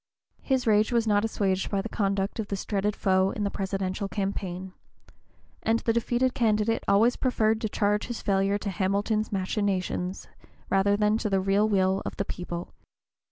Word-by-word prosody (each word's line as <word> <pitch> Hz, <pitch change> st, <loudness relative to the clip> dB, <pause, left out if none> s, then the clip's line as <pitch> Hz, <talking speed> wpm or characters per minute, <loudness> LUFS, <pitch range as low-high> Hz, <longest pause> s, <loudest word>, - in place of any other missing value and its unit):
His 260 Hz, -2 st, 0 dB
rage 215 Hz, 0 st, +3 dB
was 235 Hz, -2 st, +2 dB
not 205 Hz, -1 st, +2 dB
assuaged 195 Hz, -4 st, 0 dB
by 200 Hz, -, 0 dB
the -, -, -3 dB
conduct 195 Hz, 0 st, -1 dB
of 215 Hz, -, -2 dB
this 195 Hz, -1 st, -4 dB
dreaded 205 Hz, 0 st, 0 dB
foe 190 Hz, -1 st, +2 dB
in 205 Hz, -, -3 dB
the 200 Hz, -, -1 dB
presidential 195 Hz, 0 st, -2 dB
campaign; 190 Hz, -2 st, -4 dB, 0.9 s
and 225 Hz, +1 st, +2 dB
the 230 Hz, -, +1 dB
defeated 240 Hz, +2 st, +1 dB
candidate 220 Hz, -1 st, +1 dB
always 225 Hz, +5 st, +4 dB
preferred 220 Hz, -4 st, +1 dB
to 220 Hz, -, -1 dB
charge 205 Hz, 0 st, 0 dB
his 240 Hz, -1 st, -4 dB
failure 195 Hz, 0 st, +1 dB
to 205 Hz, -1 st, -4 dB
Hamilton's 205 Hz, +3 st, 0 dB
machinations 190 Hz, -2 st, -2 dB, 0.4 s
rather 200 Hz, +1 st, +3 dB
than 210 Hz, +1 st, +2 dB
to 215 Hz, -, -1 dB
the 195 Hz, -1 st, +2 dB
real 195 Hz, +3 st, +2 dB
will 190 Hz, -1 st, +2 dB
of -, -, -6 dB
the 200 Hz, -, -1 dB
people. 175 Hz, -1 st, -6 dB
205 Hz, 170 wpm, -27 LUFS, 195-215 Hz, 0.9 s, always